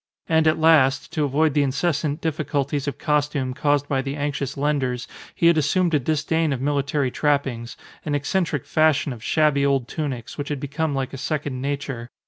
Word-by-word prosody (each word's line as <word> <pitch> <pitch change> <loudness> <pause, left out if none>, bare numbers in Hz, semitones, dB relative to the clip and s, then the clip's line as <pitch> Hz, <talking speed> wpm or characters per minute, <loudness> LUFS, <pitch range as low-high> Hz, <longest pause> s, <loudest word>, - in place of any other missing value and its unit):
And 160 -1 +3
at 155 - +3
last, 155 -4 +4
to 155 -3 +1
avoid 150 +2 +2
the 145 - +3
incessant 145 +2 0
difficulties 145 -2 -1
of 140 - -3
costume 150 -4 0
caused 145 +1 +1
by 135 -2 0
the 135 +1 -4
anxious 140 -1 -3
lenders, 135 -4 -1 0.3
he - - 0
had 170 -1 +6
assumed 170 +4 +1
a 150 - +4
disdain 155 +3 0
of 135 - -1
military 140 -1 0
trappings, 135 -6 -1 0.3
an 145 - -1
eccentric 150 0 -1
fashion 155 -3 +2
of 115 -2 -11
shabby 150 -2 +2
old 135 -3 +1
tunics, 140 -6 -5
which 145 - -3
had 145 -2 -2
become 145 +2 -2
like 135 0 -3
a 135 - -6
second 145 -3 -3
nature. 135 -3 -4
145 Hz, 180 wpm, -23 LUFS, 135-155 Hz, 0.3 s, had